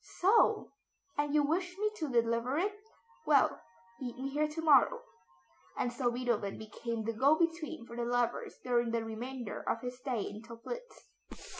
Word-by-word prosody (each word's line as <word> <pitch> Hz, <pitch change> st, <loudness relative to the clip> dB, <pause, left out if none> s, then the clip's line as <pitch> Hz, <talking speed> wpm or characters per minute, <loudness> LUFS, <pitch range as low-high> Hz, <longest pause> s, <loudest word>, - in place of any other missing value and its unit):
"So! 405 Hz, +5 st, +4 dB, 0.4 s
And 290 Hz, 0 st, 0 dB
you 295 Hz, -, +5 dB
wish 355 Hz, +5 st, 0 dB
me 425 Hz, +1 st, +1 dB
to 310 Hz, -6 st, -2 dB
deliver 235 Hz, +2 st, +1 dB
it? 400 Hz, +5 st, +1 dB, 0.5 s
Well, 285 Hz, -3 st, +4 dB, 0.4 s
meet 245 Hz, -2 st, -5 dB
me 265 Hz, +1 st, -3 dB
here 300 Hz, +2 st, +1 dB
to 305 Hz, +2 st, -6 dB
morrow;" 325 Hz, -, +5 dB, 0.7 s
and 245 Hz, -, 0 dB
so 240 Hz, 0 st, +1 dB
Beethoven 240 Hz, -5 st, -1 dB
became 220 Hz, +1 st, -4 dB
the 230 Hz, +1 st, -1 dB
go 275 Hz, +7 st, +5 dB
between 330 Hz, -5 st, -1 dB
for 235 Hz, -, -10 dB
the 240 Hz, -, -2 dB
lovers 240 Hz, 0 st, 0 dB
during 240 Hz, -1 st, +2 dB
the 230 Hz, 0 st, 0 dB
remainder 240 Hz, +1 st, -5 dB
of 230 Hz, -, 0 dB
his 250 Hz, 0 st, -5 dB
stay 250 Hz, -5 st, -1 dB
in 210 Hz, +1 st, -6 dB
Töplitz. 235 Hz, -, -8 dB
250 Hz, 165 wpm, -33 LUFS, 235-310 Hz, 0.7 s, you